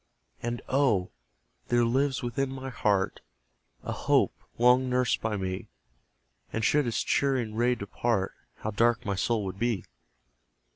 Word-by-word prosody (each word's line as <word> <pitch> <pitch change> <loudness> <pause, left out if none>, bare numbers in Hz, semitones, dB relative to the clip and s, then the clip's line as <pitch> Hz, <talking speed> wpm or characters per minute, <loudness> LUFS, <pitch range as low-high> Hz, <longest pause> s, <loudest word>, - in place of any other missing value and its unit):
And, 120 0 -3
oh! 125 -10 +2 0.6
there 120 0 +3
lives 130 +3 +1
within 125 +3 -1
my 135 0 -5
heart 100 -5 +1 0.6
A - - -4
hope, - - +2 0.2
long 125 +2 +5
nursed 125 -1 +1
by 110 -2 -1
me; 95 -1 -3 0.8
(And 110 -1 -1
should 145 +1 +3
its 115 - 0
cheering 130 -6 +1
ray 120 +2 +2
depart, 100 -1 -1 0.3
How 110 - -2
dark 115 +3 +2
my 100 - 0
soul 105 +2 0
would 95 0 -5
be!) 115 -5 0
120 Hz, 140 wpm, -28 LUFS, 105-125 Hz, 0.8 s, long